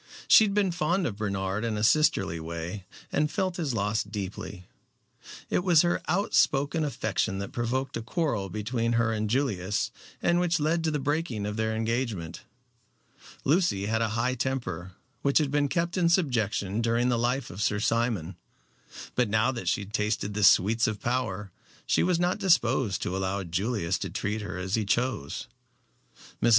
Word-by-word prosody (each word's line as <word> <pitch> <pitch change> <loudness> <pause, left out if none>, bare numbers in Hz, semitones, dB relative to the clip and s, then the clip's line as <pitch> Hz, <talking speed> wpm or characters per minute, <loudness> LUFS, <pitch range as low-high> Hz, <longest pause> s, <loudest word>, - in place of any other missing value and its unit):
She 220 - +8
had 200 -1 -2
been 200 -3 +2
fond 175 +2 0
of 105 -8 -3
Bernard 100 0 -2
in 115 -2 -1
a 105 - -2
sisterly 110 - +3
way, 85 +4 -6 0.3
and 150 +1 +1
felt 185 0 -1
his 150 -8 -2
loss 105 +1 0
deeply. 100 -2 -6 0.8
It - - 0
was 175 -4 +5
her 175 0 +1
outspoken 160 -5 +2
affection 110 -8 -1
that 100 0 -5
provoked 130 +3 -2
a 115 - -2
quarrel 115 - -1
between 115 +4 -1
her 115 -1 +2
and 110 -1 -1
Julius, 105 -7 0 0.3
and 175 0 +2
which 175 -1 +1
led 160 +3 +1
to - - +2
the 150 - 0
breaking 145 -6 -1
of 105 0 -3
their 110 0 -1
engagement. 110 -7 -2 1.0
Lucy 155 - +2
had 110 +2 0
a 115 - +1
high 125 +2 +1
temper, 120 -9 -3 0.3
which 140 0 +2
had 150 -3 +2
been 145 0 +2
kept 170 +3 -1
in 175 -3 +3
subjection 115 - +1
during 120 +2 +2
the 120 -2 +1
life 125 0 -1
of 90 +4 -6
Sir 105 0 +1
Simon. 110 -7 0 0.8
But 125 -3 +1
now 110 +4 +2
that 120 -8 -6
she 100 +3 0
tasted 105 0 -1
the 105 0 -1
sweets 110 +4 +5
of 110 -2 -3
power 105 -6 -2 0.3
she - - +2
was 175 -1 +2
not 180 +4 +1
disposed 130 - +2
to 90 - -2
allow 95 +1 -1
Julius 95 +2 -1
to - - -4
treat 105 +2 -2
her 105 - -5
as 95 +1 -4
he 110 - +2
chose. 110 - -1 1.0
Mrs. - - +4
115 Hz, 175 wpm, -27 LUFS, 100-145 Hz, 1.0 s, She